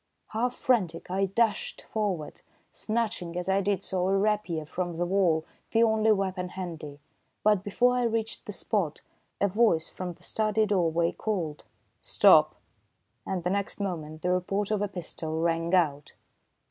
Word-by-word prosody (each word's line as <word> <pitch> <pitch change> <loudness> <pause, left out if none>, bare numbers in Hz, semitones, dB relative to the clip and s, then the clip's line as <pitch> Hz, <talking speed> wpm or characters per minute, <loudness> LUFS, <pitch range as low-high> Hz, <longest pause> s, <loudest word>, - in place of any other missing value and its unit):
Half 240 +3 -1
frantic, 180 -9 0
I 195 +1 +2
dashed 210 +2 0
forward, 195 -8 -3 0.3
snatching 215 -6 -2
as 180 - -3
I 195 +1 +2
did 200 -1 0
so 185 -1 -1
a 195 +1 +2
rapier 195 -6 0
from 175 +2 -3
the 175 +2 0
wall, 175 -4 +2 0.3
the 225 0 +5
only 220 -1 +3
weapon 190 -3 0
handy. 165 -6 -7 0.4
But 210 -3 +3
before 245 +5 +2
I 250 - +1
reached 225 -1 -2
the - - -3
spot, 190 -4 -2 0.4
a 200 - +3
voice 200 -5 +2
from 180 -1 -5
the - - -16
study 215 0 +1
doorway 170 -4 +1
called: 175 -9 -3 0.4
"Stop!" - - +5 0.7
and 185 -3 -2
the 180 - 0
next 200 +1 -2
moment 160 -5 -4
the 180 - +1
report 195 +3 0
of 210 -2 +1
a 205 - +1
pistol 160 -4 -5
rang 165 +1 +1
out. 145 -5 +1
190 Hz, 160 wpm, -28 LUFS, 170-210 Hz, 0.7 s, the